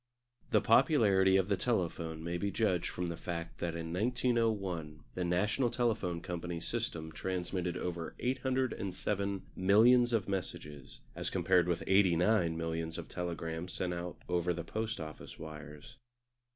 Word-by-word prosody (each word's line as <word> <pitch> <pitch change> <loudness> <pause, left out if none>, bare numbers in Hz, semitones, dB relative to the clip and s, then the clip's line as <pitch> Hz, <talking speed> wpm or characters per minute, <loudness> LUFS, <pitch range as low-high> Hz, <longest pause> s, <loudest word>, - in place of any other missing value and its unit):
The - - +4
popularity 100 -9 +5
of 95 -1 +2
the 100 - +2
telephone 85 -7 -1
may 85 +1 -2
be 100 - 0
judged 95 -3 +1
from 90 - -3
the 85 -1 -3
fact 85 0 -5
that 85 -1 -2
in 80 0 -4
1901 105 -8 0
the 90 - -2
National 105 +8 +1
Telephone 110 -8 0
Company's 85 -1 -4
system 110 -9 -3
transmitted 90 0 -2
over 85 -2 -4
807 105 -7 -1
millions 120 +6 +5
of 110 -5 +1
messages, 75 -7 -5
as - - -2
compared 90 -2 +3
with 85 -1 0
89 90 -2 +3
millions 80 0 -3
of - - -7
telegrams 85 0 -4
sent 90 -1 -2 0.3
over 90 0 +1
the 85 - -4
Post 110 +4 -3
Office 80 -1 -8
wires. 75 - -10
90 Hz, 140 wpm, -33 LUFS, 85-105 Hz, 0.3 s, popularity